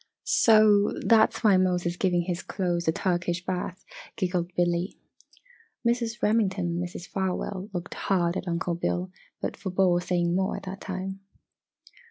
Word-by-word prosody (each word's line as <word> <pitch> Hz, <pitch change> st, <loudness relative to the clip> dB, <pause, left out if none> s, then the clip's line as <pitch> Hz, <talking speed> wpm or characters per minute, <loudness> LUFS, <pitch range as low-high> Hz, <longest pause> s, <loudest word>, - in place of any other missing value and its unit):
"So, 215 Hz, -, +5 dB
that's 225 Hz, 0 st, +4 dB
why 205 Hz, -4 st, +6 dB
Mose 180 Hz, -1 st, +1 dB
is 175 Hz, 0 st, -1 dB
giving 180 Hz, -2 st, +1 dB
his 175 Hz, +1 st, -3 dB
clothes 175 Hz, -3 st, -2 dB
a -, -, +5 dB
Turkish 175 Hz, 0 st, -1 dB
bath," 185 Hz, 0 st, -4 dB, 0.3 s
giggled 180 Hz, -2 st, -1 dB
Billy. 175 Hz, +2 st, 0 dB, 0.9 s
Mrs. 235 Hz, -1 st, -1 dB
Remington 205 Hz, -4 st, +2 dB
and 170 Hz, +1 st, -1 dB
Mrs. 175 Hz, 0 st, -7 dB
Farwell 190 Hz, +1 st, -3 dB
looked 175 Hz, -2 st, -5 dB
hard 175 Hz, -3 st, 0 dB
at 190 Hz, -, -4 dB
Uncle 170 Hz, 0 st, -1 dB
Bill 175 Hz, +2 st, -2 dB, 0.3 s
but -, -, -2 dB
forbore 185 Hz, -2 st, +1 dB
saying 175 Hz, -1 st, 0 dB
more 190 Hz, 0 st, 0 dB
at -, -, -9 dB
that 195 Hz, +1 st, -7 dB
time. 190 Hz, 0 st, -5 dB
185 Hz, 150 wpm, -27 LUFS, 175-195 Hz, 0.9 s, why